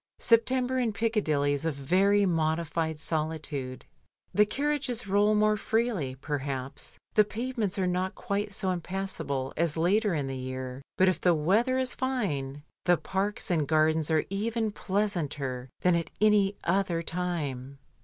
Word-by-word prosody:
September 255 +2 +3
in 240 -3 +1
Piccadilly 200 -11 +1
is 145 - -3
a 165 - +1
very 190 +9 +3
modified 160 -2 0
soli 160 0 -1
tude. 135 -5 -5 0.5
The 210 0 +5
carriages 275 -2 -1
roll 205 +2 +3
more 215 0 +3
freely, 215 - 0
perhaps, 135 -3 -4 0.2
the 215 - +6
pavements 220 -1 -2
are 190 - +1
not 180 +1 -1
quite 205 -2 -2
so 190 -1 -1
impassable 175 -7 -3
as 165 -1 0
later 195 +3 +2
in 145 -3 -1
the 135 0 -4
year, 130 0 -5 0.2
but 190 - +5
if 185 - +1
the 175 -2 +4
weather 215 - +2
is 260 -1 0
fine, 150 - -2 0.2
the 175 -1 +5
parks 195 +2 -2
and 155 -5 +1
gardens 155 0 +2
are 160 -1 +2
even 220 +2 -1
pleasanter 150 -12 -2
than 180 - +4
at 170 -1 0
any 205 -1 +4
other 175 -2 +1
time. 150 -7 -3
180 Hz, 150 wpm, -28 LUFS, 150-210 Hz, 0.5 s, the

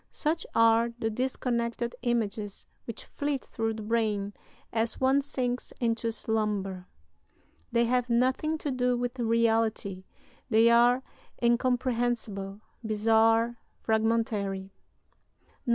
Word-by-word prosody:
Such 320 +2 -1
are 230 +1 +5
the 225 -2 -1
disconnected 235 -1 -2
images 215 -4 -2 0.2
which 230 -2 -7
flit 285 -2 -3
through 225 -1 -2
the 215 - -6
brain 210 -2 0 0.4
as 225 0 0
one 265 +2 +4
sinks 250 -3 -3
into 230 -1 0
slumber. 205 -5 -2 0.8
They 235 0 +3
have 250 +1 +1
nothing 260 +6 +2
to 295 -2 -3
do 250 -1 +1
with 245 +1 -3
reality; 225 -4 +1 0.4
they 230 0 +5
are 240 +2 +5 0.4
incomprehensible, 235 -4 0 0.2
bizarre, 225 +2 +3 0.2
fragmentary. 220 -4 0
"[IV. 255 - -17
230 Hz, 105 wpm, -28 LUFS, 220-245 Hz, 0.8 s, are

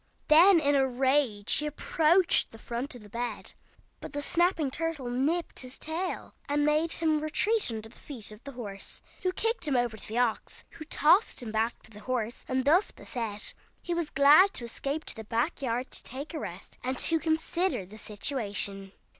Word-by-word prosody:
Then 340 +4 +8
in 285 -2 +2
a 270 -1 +3
rage 260 -5 +1
he 300 - -1
approached 325 +4 +2
the 225 - -13
front 240 +4 -4
of 240 - -11
the 205 - -14
bed, 240 +3 -4 0.5
but - - -9
the 290 - -2
snapping 335 -4 +1
turtle 310 -5 -3
nipped 300 +7 -1
his 255 0 -4
tail, 340 +4 -3 0.2
and 290 0 +2
made 305 +2 +3
him 315 -2 +2
retreat 395 - +1
under 220 -1 -5
the 225 - -17
feet 240 -8 -5
of 210 +2 -13
the 280 - -8
horse, 205 -5 -7 0.2
who 365 - +1
kicked 450 -2 0
him 280 - +1
over 240 -2 +1
to 220 - -4
the 220 - -4
ox, 245 -3 -1
who 310 - -10
tossed 320 - +3
him 220 - -5
back 220 +2 -1
to 220 - -10
the 210 - -11
horse; 235 0 -3
and 260 0 -1
thus 345 +8 +4
beset 220 -4 -5 0.3
he 350 - -2
was 340 -3 -2
glad 300 +8 +6
to - - 0
escape 275 +6 -3
to - - -1
the 220 - -7
back 235 +10 -1
yard 250 0 -2
to - - 0
take 280 +7 -6
a 315 - -3
rest, 180 -7 -8
and 260 +1 -2
to 325 +4 +4
consider 320 - 0
the 215 +4 -11
situation. 205 -4 -3
275 Hz, 195 wpm, -29 LUFS, 230-315 Hz, 0.5 s, Then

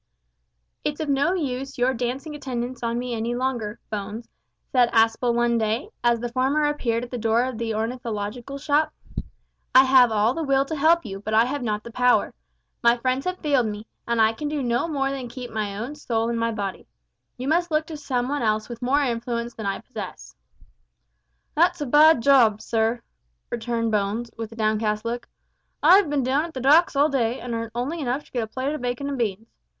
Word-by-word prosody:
"It's 295 +1 -2
of 310 -2 -3
no 280 +6 +2
use 270 -5 -3
your 250 +2 +2
dancing 255 +5 -3
attendance 255 -3 -4
on 235 0 -1
me 245 0 -3
any 230 +1 -2
longer, 240 -4 -2
Bones," 215 +2 -5 0.4
said 245 -2 +4
Aspel 225 +2 +3
one 235 0 +2
day, 225 - -1
as 235 -1 +3
the 240 0 -4
former 270 +4 +2
appeared 245 -6 0
at 245 - -8
the 245 - -4
door 225 +1 +2
of 255 -3 -4
the 225 -2 -2
ornithological 230 +2 -4
shop. 295 +2 +1 0.8
"I 260 - +10
have 260 -3 +6
all 215 +2 +2
the 330 - -3
will 275 -2 +2
to 315 - -4
help 320 +1 +3
you, 195 -2 -6
but 215 +2 -2
I 225 +2 +6
have 280 +3 -3
not 210 -3 -2
the 235 - -9
power. 250 +1 +2 0.5
My 235 0 +4
friends 255 +2 -1
have 365 0 -2
failed 275 -6 +2
me, 210 0 -5 0.2
and 235 -1 0
I 220 0 +4
can 295 +6 -4
do 295 -2 -2
no 240 +5 0
more 275 -4 -1
than 260 -3 -5
keep 245 0 -8
my 210 -2 -3
own 240 +7 -4
soul 230 -6 -1
in 235 - -1
my 230 0 0
body. 200 -3 -5 0.5
You 255 +2 -5
must 345 +3 +2
look 310 0 +1
to 325 - -7
some 250 -4 -2
one 285 +1 -1
else 215 0 0
with 235 0 -8
more 275 +4 +2
influence 235 -1 -2
than 220 -3 -5
I 195 - -2
possess." - - -8 1.2
"That's 340 +4 +3
a 295 - -2
bad 295 0 +6
job, 235 -6 +5
sir," 225 +1 0 0.5
returned 230 -1 -1
Bones, 210 +3 -1
with 225 -1 -6
a - - -10
downcast 215 -1 0
look. 240 +1 -3 0.6
"I've 360 +2 +6
bin 285 -2 0
down 265 +4 +1
at 335 - -10
the - - -3
docks 300 +6 +5
all 285 +2 +5
day, 245 -3 0
an' 245 -1 -5
earned 230 -1 -3
only 275 +8 -2
enough 265 +2 -1
to - - -23
get 245 - -1
a 220 - -3
plate 260 +6 -3
of 305 - -5
bacon 245 +3 -2
and 280 -1 -3
beans. 220 -1 -2
245 Hz, 210 wpm, -24 LUFS, 230-275 Hz, 1.2 s, I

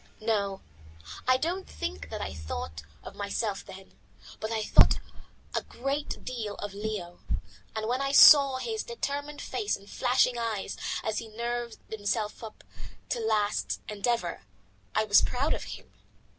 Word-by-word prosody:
No, 200 -3 0 0.7
I 255 0 +6
don't 350 +7 -2
think 80 -1 -5
that - - -5
I - - -3
thought 80 0 -5 0.2
of - - -8
myself 200 +1 -2
then, 190 - -13 0.4
but 220 +1 -3
I 220 -1 0
thought - - +6 0.6
a - - +1
great 275 +4 -3
deal 225 -5 -3
of 205 -1 -6
Leo, 200 -4 -4 0.6
and 220 0 -2
when 250 +3 0
I 275 0 0
saw 280 -2 +9
his 440 - -2
determined 290 - -4
face 415 - -1
and 200 - -17
flashing 250 +1 +2
eyes 225 -4 -2 0.3
as 220 -1 0
he 230 - -7
nerved 235 +1 -3
himself 210 0 -1
to 220 -2 -8 0.6
the - - -3
last 210 -2 +1
endeavour, 210 - -1 0.5
I 215 - +4
was 205 -1 +7
proud 275 +5 +1
of - - -4
him. - - -9
220 Hz, 150 wpm, -29 LUFS, 205-255 Hz, 0.7 s, saw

